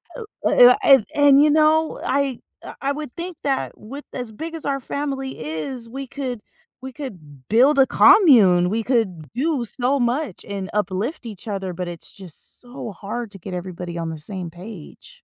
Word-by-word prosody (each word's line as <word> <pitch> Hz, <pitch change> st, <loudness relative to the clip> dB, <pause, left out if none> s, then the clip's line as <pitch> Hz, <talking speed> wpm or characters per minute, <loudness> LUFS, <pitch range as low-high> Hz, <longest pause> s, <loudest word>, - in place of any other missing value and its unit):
L 470 Hz, -, -7 dB, 0.2 s
uh, 245 Hz, 0 st, +7 dB
I -, -, +2 dB, 0.3 s
a -, -, -3 dB
and, 285 Hz, -1 st, +7 dB
you 300 Hz, -, +5 dB
know, 310 Hz, +1 st, +3 dB
I 275 Hz, -2 st, 0 dB, 0.2 s
I -, -, -9 dB
I 275 Hz, -, 0 dB
would 300 Hz, -3 st, -6 dB
think 350 Hz, +1 st, -5 dB
that 275 Hz, -2 st, -1 dB
with 275 Hz, +7 st, -9 dB
as 245 Hz, -4 st, -5 dB
big 325 Hz, +9 st, -7 dB
as 320 Hz, -, -7 dB
our 275 Hz, -1 st, 0 dB
family 270 Hz, -1 st, -4 dB
is, 230 Hz, -, -5 dB
we 270 Hz, +3 st, -6 dB
could 255 Hz, -3 st, -5 dB, 0.4 s
we 260 Hz, -1 st, -8 dB
could 155 Hz, -, -10 dB
build 265 Hz, +6 st, +5 dB
a 270 Hz, -, +7 dB
commune, 200 Hz, -, +6 dB
we 225 Hz, +3 st, -1 dB
could 205 Hz, -, -1 dB
do 270 Hz, 0 st, 0 dB
so 255 Hz, +5 st, +1 dB
much 240 Hz, -, -1 dB
and 195 Hz, -2 st, -5 dB
uplift 210 Hz, -, -2 dB
each 215 Hz, -2 st, -9 dB
other, 195 Hz, -3 st, -3 dB
but 180 Hz, 0 st, -4 dB
it's 170 Hz, -1 st, -10 dB
just 185 Hz, -6 st, -8 dB
so 245 Hz, -2 st, -8 dB
hard 215 Hz, +4 st, -6 dB
to 195 Hz, -, -11 dB
get 185 Hz, +2 st, -8 dB
everybody 180 Hz, -1 st, -6 dB
on 165 Hz, -1 st, -3 dB
the 160 Hz, -, -6 dB
same 180 Hz, +2 st, -6 dB
page. 175 Hz, 0 st, -12 dB
240 Hz, 190 wpm, -22 LUFS, 185-275 Hz, 0.4 s, uh